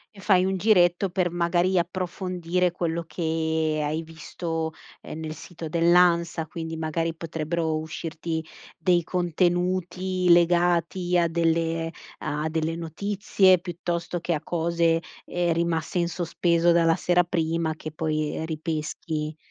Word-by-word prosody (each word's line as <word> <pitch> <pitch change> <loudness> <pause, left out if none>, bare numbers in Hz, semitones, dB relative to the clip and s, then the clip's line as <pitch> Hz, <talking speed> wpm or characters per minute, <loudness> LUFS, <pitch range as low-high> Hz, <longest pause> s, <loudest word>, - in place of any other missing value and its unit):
E - - -13
fai 185 -2 +4
un 190 0 0
giretto 180 -2 +3
per, 175 0 0
magari, 175 +2 +1
approfondire 180 0 -1
quello 170 -1 -2
che 160 -2 -1
hai 155 +2 -1
visto, 165 0 -4 0.3
ehm, 160 - -8
nel 155 -1 -4
sito 165 0 -8
dell'ANSA, 170 -1 +3
quindi 160 0 -5
magari 165 +1 -1
potrebbero 160 0 -2
uscirti 160 +1 -4 0.3
dei 175 0 +2
contenuti 180 +1 0
legati 175 +1 +3
a 170 -1 +3
delle 165 0 0 0.3
a 155 0 -2
delle 160 +1 -1
notizie, 185 +2 +2
piuttosto 175 0 -3
che 170 0 -1
a 150 - -2
cose, 170 0 +1 0.2
ehm, 175 -1 0
rimaste 170 +1 -1
in 170 - +1
sospeso 170 0 +1
dalla 165 -1 +4
sera 180 0 +3
prima 165 -1 -1
che 155 - -7
poi 155 0 -2
ripeschi. 155 -1 -3
170 Hz, 125 wpm, -25 LUFS, 160-175 Hz, 0.3 s, fai